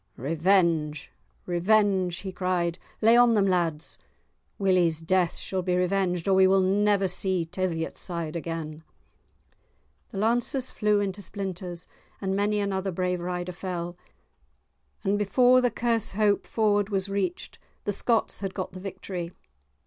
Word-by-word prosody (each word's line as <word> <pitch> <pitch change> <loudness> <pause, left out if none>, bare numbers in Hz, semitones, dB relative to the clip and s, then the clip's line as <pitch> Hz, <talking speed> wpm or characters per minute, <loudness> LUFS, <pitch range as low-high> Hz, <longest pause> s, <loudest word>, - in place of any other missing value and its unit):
"Revenge! 160 +1 +1 0.3
revenge!" 185 0 +2
he 190 - -5
cried; 180 -2 -1 0.2
"lay 225 +2 +6
on 240 -1 +6
them, 200 -2 +3
lads. 170 -4 -1 0.6
Willie's 180 -5 +2
death 175 +1 +1
shall 190 -1 -3
be 180 0 0
revenged 180 -1 0
or 195 - +4
we 190 0 +6
will 190 +1 +4
never 200 +1 +2
see 185 -1 0
Teviotside 170 -1 -3
again." 160 -2 -5 1.3
The - - -8
lances 240 +5 +1
flew 210 -1 +1
into 200 0 -3
splinters, 185 -3 -5 0.3
and 190 -1 -2
many 205 +1 +1
another 195 -1 -1
brave 180 0 -1
rider 180 0 -3
fell, 175 -1 -5 1.1
and 205 0 +1
before 250 +5 +4
the 250 - +2
Kershope 220 -4 +1
ford 205 -2 +1
was 195 -1 -1
reached, 195 -3 -3 0.2
the 205 - -1
Scots 230 +3 +1
had 195 -2 -5
got 185 - -4
the 185 - -9
victory. 180 -2 -6
190 Hz, 135 wpm, -26 LUFS, 175-205 Hz, 1.3 s, lay